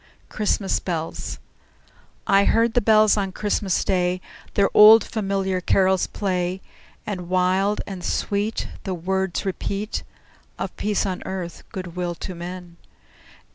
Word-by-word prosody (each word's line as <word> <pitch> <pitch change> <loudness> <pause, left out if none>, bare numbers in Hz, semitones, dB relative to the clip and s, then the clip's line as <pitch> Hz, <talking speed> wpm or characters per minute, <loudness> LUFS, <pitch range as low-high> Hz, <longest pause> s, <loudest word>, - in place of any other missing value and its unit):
CHRISTMAS 205 -2 0
BELLS 165 -3 -4 0.9
I 195 0 +4
heard 230 0 +3
the 245 - +3
bells 215 0 +5
on 195 -2 -1
Christmas 200 -1 0
Day 180 -1 +1 0.4
Their 200 -1 +4
old, 220 +2 +9
familiar 195 -3 -1
carols 190 +1 +2
play, 185 -2 -2 0.5
And 180 -4 -5
wild 185 +3 +2
and 190 -3 -7
sweet 205 +4 -1 0.2
The 190 -2 -3
words 190 +2 -2
repeat 200 +2 -3 0.6
Of - - -5
peace 210 -1 0
on 185 -2 -3
earth, 185 -3 -5
good 185 -3 -7
will 175 -1 -2
to 185 - -6
men! 175 0 -8
190 Hz, 130 wpm, -23 LUFS, 180-205 Hz, 0.9 s, old